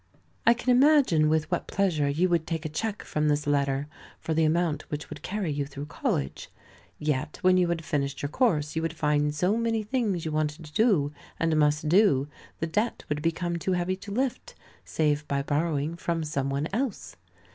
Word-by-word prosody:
I 235 - +7
can 250 +1 0
imagine 255 - +5
with 155 +1 0
what 175 - -1
pleasure 170 -7 +1
you 165 +6 +2
would 170 -3 0
take 165 -1 -3
a - - -1
cheque 210 +7 -3
from 150 0 -1
this 150 0 +1
letter, 140 -1 +1 0.3
for 160 - -2
the 160 0 +3
amount 160 -2 0
which 150 0 -5
would - - -7
carry 195 -4 -2
you 145 -1 -2
through 140 0 -7
college. 70 - -3 0.5
Yet 150 -1 -2
when 185 0 +5
you 180 -1 +3
had 170 -2 -2
finished 140 -1 -2
your 145 - -1
course, 155 - +1
you 160 - 0
would 165 0 -2
find 150 -1 +1
so 180 +7 +2
many 230 -1 0
things 210 -7 -1
you 160 - -2
wanted 155 +1 -2
to 150 - -13
do, 175 -11 +3 0.3
and 165 -1 +2
must 150 0 +2
do, 155 -6 +4 0.3
the 165 - -2
debt 210 +9 -1
would 150 0 -1
become 170 +2 -1
too 185 +3 -1
heavy 180 +1 0
to 200 +1 -9
lift, 255 +4 -2 0.3
save 150 -1 0
by 140 0 -1
borrowing 150 +1 -1
from 170 -1 -2
some 140 -3 -2
one 140 +3 -1
else. 230 - -3
160 Hz, 200 wpm, -27 LUFS, 150-185 Hz, 0.5 s, I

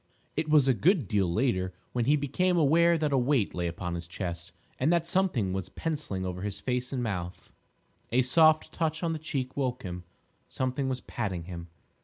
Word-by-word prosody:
It 155 - -1
was 150 -3 +5
a 135 - +5
good 160 - +2
deal 95 -4 +1
later 95 -4 0 0.2
when 120 -2 0
he 145 +4 +4
became 175 +6 +1
aware 170 +2 +5
that 150 -2 0
a 135 - +4
weight 125 -4 +1
lay 90 -1 -1
upon 85 +1 -4
his 85 -1 -5
chest, 85 0 -5 0.3
and 140 +6 +3
that 170 -1 +2
something 170 - +1
was 95 -1 -3
pencilling 145 -13 -3
over 90 0 -4
his 100 0 -3
face 125 0 -2
and 130 -3 -1
mouth. 90 -5 -5 0.6
A 125 +2 +4
soft 155 +4 +4
touch 160 0 -1
on 165 -1 +1
the 160 - -4
cheek 135 -4 -3
woke 130 -3 -1
him. 90 -2 -6 0.4
Something 130 +1 -2
was 130 -1 -2
patting 95 -7 -3
him. 85 -1 -7
125 Hz, 195 wpm, -29 LUFS, 95-155 Hz, 0.6 s, was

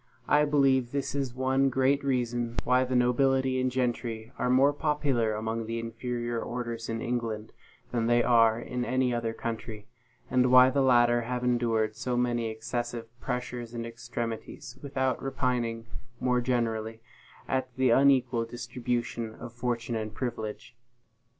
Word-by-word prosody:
I 150 0 +4
believe 135 -4 +3
this 140 -1 -2
is 135 -3 -2
one 130 +1 +2
great 135 +2 +2
reason 120 -3 -1
why 125 +1 +3
the 130 0 -2
nobility 130 +1 +2
and 130 - +1
gentry 120 -3 -2
are - - +1
more 135 +3 +5
popular 140 -8 0
among 110 +1 -3
the 115 +1 -3
inferior 120 0 -3
orders 120 -1 -4
in 115 0 -3
England 115 -3 -3 0.4
than 115 -2 0
they 120 0 +4
are 115 -2 +4
in 125 +1 -3
any 125 0 +1
other 115 -1 -1
country; 115 -2 -5 0.4
and 125 0 +2
why 130 0 +8
the 140 - +2
latter 120 -2 +4
have 125 +1 -3
endured 115 -3 +1
so 125 +1 -2
many 120 -2 0
excessive 115 +1 -4
pressures 125 -2 -4
and 115 0 -3
extremities, 115 0 -6
without 130 -3 -1
repining 125 -4 -1 0.3
more 125 -1 +2
generally 115 -2 -1 0.5
at 130 -1 -1
the 130 -2 +3
unequal 130 -3 +4
distribution 120 -1 -3
of 115 - -9
fortune 120 -1 -2
and 110 -1 -3
privilege. 120 -1 -5
120 Hz, 145 wpm, -28 LUFS, 115-130 Hz, 0.5 s, why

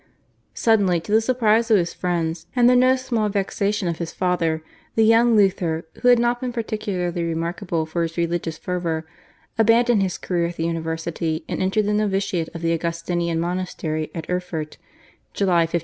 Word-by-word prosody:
Suddenly, 200 -6 +3
to 205 - -8
the 220 +1 +5
surprise 230 -1 +2
of 220 - +6
his 175 -2 -1
friends, 170 -2 -2
and 245 -1 +5
the 250 - +6
no 255 +1 +5
small 235 -5 -1
vexation 200 0 -1
of 170 -1 -2
his 170 -1 -4
father 165 -3 0 0.3
the 225 - +4
young 230 +1 +5
Luther, 180 -5 +2 0.2
who - - +2
had 245 0 +7
not 240 +1 +1
been 255 -1 -2
particularly 200 -7 -2
remarkable 165 +1 -2
for 165 +2 -3
his 165 0 -3
religious 170 -1 -1
fervour, 170 -3 -3 0.5
abandoned 230 0 +4
his 185 -2 -1
career 170 -2 -1
at 170 - -7
the 165 - -2
university 165 -1 -3
and - - -3
entered 195 +3 +1
the 210 - 0
novitiate 195 -5 0
of 165 - -6
the 165 0 +2
Augustinian 170 0 -1
monastery 170 -3 -3
at 165 -2 -5
Erfurt 180 -4 -4 0.6
(July 175 -4 +3
1505). 170 - 0
180 Hz, 175 wpm, -22 LUFS, 165-215 Hz, 0.6 s, had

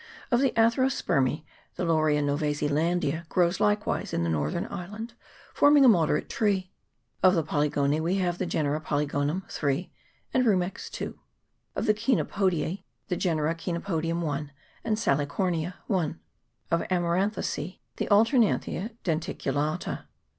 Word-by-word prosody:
Of 240 - +4
the 275 - +4
Atherospermece, 225 - +2 0.3
the 180 - -2
Laurelia 155 -3 +2
Nov. 145 0 0
Zeland. 150 +3 0 0.3
grows 175 -1 +2
likewise 210 0 0
in 85 - 0
the 85 - 0
northern 75 -1 -1
island, 210 +6 -6 0.4
forming 285 -1 +6
a - - +8
moderate 165 -9 +3
tree. 195 -4 0 0.5
Of 185 0 +6
the 165 - +2
Polygonece 145 0 +1
we 170 +4 0
have 180 -2 0
the 185 - -1
genera 155 -2 0
Polygonum 150 +3 -1
(3) 145 +4 -2 0.4
and 255 - +3
Rumex 190 -5 0
("2). - - -6 0.6
Of - - -1
the 215 - +4
Chenopodieee 195 - 0 0.3
the 180 - +1
genera 160 -3 0
Chenopodium 170 -1 -2
(1) 145 -1 -3 0.3
and 215 -1 0
Salicornia 165 +1 0
(1). 165 -5 -1 0.5
Of 170 - +3
Amaranthacece~\he 180 -1 -1
Alternant 225 +2 +4
hia 200 +6 -4
denticulata. 155 -2 -2
170 Hz, 130 wpm, -27 LUFS, 150-200 Hz, 0.6 s, a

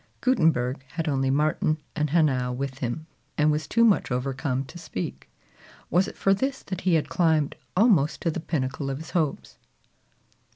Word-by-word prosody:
Gutenberg 155 - +2
had 165 -1 -2
only 135 -2 +1
Martin 155 +2 +1 0.2
and 150 -2 0
Hanau 135 -6 +2
with 135 +1 -4
him, 130 +4 -3 0.3
and 150 0 +4
was 150 0 -1
too 230 0 +4
much 215 -4 +3
overcome 130 +1 -1
to 175 - -11
speak. 90 - -6 0.6
Was 180 +4 +3
it - - -9
for 195 - +3
this 270 +7 -2
that 185 -2 -5
he 180 -3 +3
had 155 - +1
climbed 160 -3 +2 0.2
almost 190 - +4
to 165 - +1
the 165 - -4
pinnacle 140 -3 -2
of 135 - -2
his 160 +2 -9
hopes? 160 -6 -2
155 Hz, 170 wpm, -26 LUFS, 135-170 Hz, 0.6 s, and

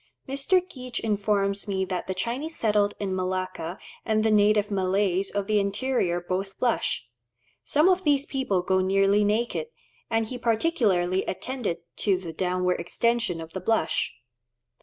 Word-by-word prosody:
Mr. 350 +7 +1
Geach 255 -5 -5
informs 200 -2 0
me 190 -1 0
that 185 -2 -4
the 190 - -2
Chinese 255 - -3
settled 210 -2 +2
in 195 -2 -2
Malacca 185 -2 -3 0.3
and 215 -1 +1
the 220 - +3
native 210 0 +4
Malays 195 0 +1
of 200 -1 -2
the 210 0 +2
interior 200 -3 0
both 185 +2 -3
blush. 240 - 0 0.6
Some 300 +4 +3
of 370 0 +3
these 285 -3 +2
people 235 -12 -1
go 190 +1 +2
nearly 195 +2 +3
naked, 230 - 0 0.4
and 225 -1 +1
he 245 +3 -6
particularly 215 - +1
attended 200 -5 -3 0.2
to 195 -3 +2
the 175 -3 -7
downward 180 +1 0
extension 230 +1 0
of 165 0 -9
the 190 - -4
blush. 205 -4 +1
200 Hz, 150 wpm, -26 LUFS, 185-235 Hz, 0.6 s, native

